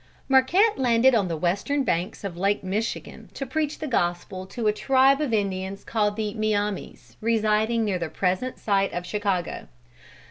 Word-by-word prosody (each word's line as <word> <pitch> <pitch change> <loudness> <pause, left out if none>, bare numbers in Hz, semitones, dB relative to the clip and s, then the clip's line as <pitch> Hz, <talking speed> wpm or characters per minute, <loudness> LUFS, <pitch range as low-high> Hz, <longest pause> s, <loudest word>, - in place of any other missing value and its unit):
Marquette 325 +12 +4
landed 250 0 +4
on 210 -5 +2
the 165 -2 -3
western 205 - 0
banks 175 -5 -2
of 195 -4 -4
Lake 195 +3 0
Michigan 205 +5 -4
to 275 - -4
preach 300 +3 -2
the - - -5
gospel 185 - -2
to 230 +3 -5
a 210 - +4
tribe 270 +5 +3
of 295 -5 -1
Indians 195 -2 -2
called 210 -2 0
the 210 -1 -2
Miames, 205 - -3
residing 220 0 +1
near 195 -3 -1
the 170 -2 -3
present 185 +9 -1
site 195 -2 +1
of 175 0 -4
Chicago. 200 -3 -2
210 Hz, 165 wpm, -25 LUFS, 190-245 Hz, -, Marquette